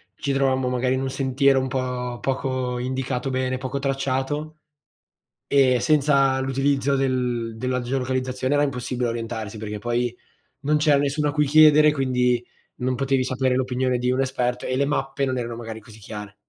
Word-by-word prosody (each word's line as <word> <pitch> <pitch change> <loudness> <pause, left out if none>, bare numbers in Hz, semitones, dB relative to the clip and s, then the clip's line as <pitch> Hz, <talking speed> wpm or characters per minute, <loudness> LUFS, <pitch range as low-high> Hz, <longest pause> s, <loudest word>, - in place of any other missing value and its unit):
ci 140 - -2
trovammo 130 -1 +1
magari 125 +1 0
in 130 - -2
un 135 - -2
sentiero 135 +1 +2
un 130 - -3
po' 125 -1 -3
poco 130 -2 -2
indicato 130 +1 -2
bene, 130 0 -1
poco 130 +2 -4
tracciato, 135 +3 -2 0.9
e 130 -3 +4
senza 140 -1 +3
l'utilizzo 135 +1 +1
del 125 -4 -1
della 125 +1 -1
geolocalizzazione 130 +1 -1
era 145 - +3
impossibile 125 -3 -1
orientarsi, 115 -2 -5
perché 105 -1 -5
poi 120 +1 -1 0.5
non 150 +1 +1
c'era 150 -1 +4
nessuno 145 +1 0
a - - -1
cui 150 0 +2
chiedere, 150 +1 +6
quindi 125 -3 +1 0.3
non 130 +1 -1
potevi 135 0 +1
sapere 130 0 0
l'opinione 130 0 0
di 125 +1 0
un 130 +1 +1
esperto, 125 -2 -1
e 130 - -1
le 140 +1 +2
mappe 135 -1 -1
non 130 -1 -1
erano 120 -1 -4
magari 115 -1 -7
così 110 0 -15
chiare. 105 -1 -8
130 Hz, 165 wpm, -23 LUFS, 125-135 Hz, 0.9 s, chiedere